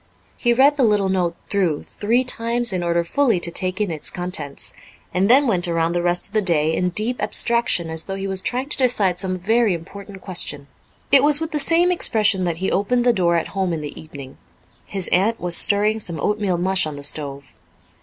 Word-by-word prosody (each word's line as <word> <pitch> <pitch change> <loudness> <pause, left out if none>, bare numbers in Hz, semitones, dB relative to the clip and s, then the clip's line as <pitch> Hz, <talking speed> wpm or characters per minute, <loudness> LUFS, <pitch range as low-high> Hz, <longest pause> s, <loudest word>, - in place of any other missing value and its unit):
He 240 - 0
read 275 +4 +4
the 270 - +2
little 205 -4 +2
note 180 -3 -1
through 180 -7 -1
three 235 +5 -1
times 235 -2 +1
in 180 - -2
order 170 0 0
fully 235 +2 +1
to 170 - 0
take 185 +2 -1
in 210 -4 -1
its 155 -2 -4
contents, 175 -6 -6 0.4
and 190 +3 +1
then 270 +4 +5
went 185 -7 0
around 165 -1 -1
the 175 - -1
rest 175 0 +1
of 200 - -11
the 215 - +2
day 160 -4 +1
in 180 - -1
deep 220 +7 -1
abstraction 235 -8 +1
as 160 0 -3
though 195 - -5
he 195 0 -5
was 190 -1 -2
trying 255 +5 -2
to - - 0
decide 210 -9 +1
some 185 -1 -1
very 220 +2 +1
important 195 +3 -11
question. 170 -7 0 0.5
It 275 - +6
was 295 0 +4
with 320 0 -5
the 300 - -2
same 335 +5 +3
expression 210 - +2
that 170 -2 -2
he 190 +2 -2
opened 240 +5 0
the 245 - +4
door 175 -4 +1
at 165 - -2
home 190 -3 -2
in 160 - -4
the 145 -1 -8
evening. 140 -4 -12 0.5
His 190 -3 -3
aunt 210 +6 +1
was 175 -1 +2
stirring 210 +3 +3
some 170 -6 -3
oatmeal 205 +1 -1
mush 185 -1 +1
on 150 - -7
the 145 - -10
stove. 140 -2 -3
190 Hz, 215 wpm, -20 LUFS, 170-230 Hz, 0.5 s, It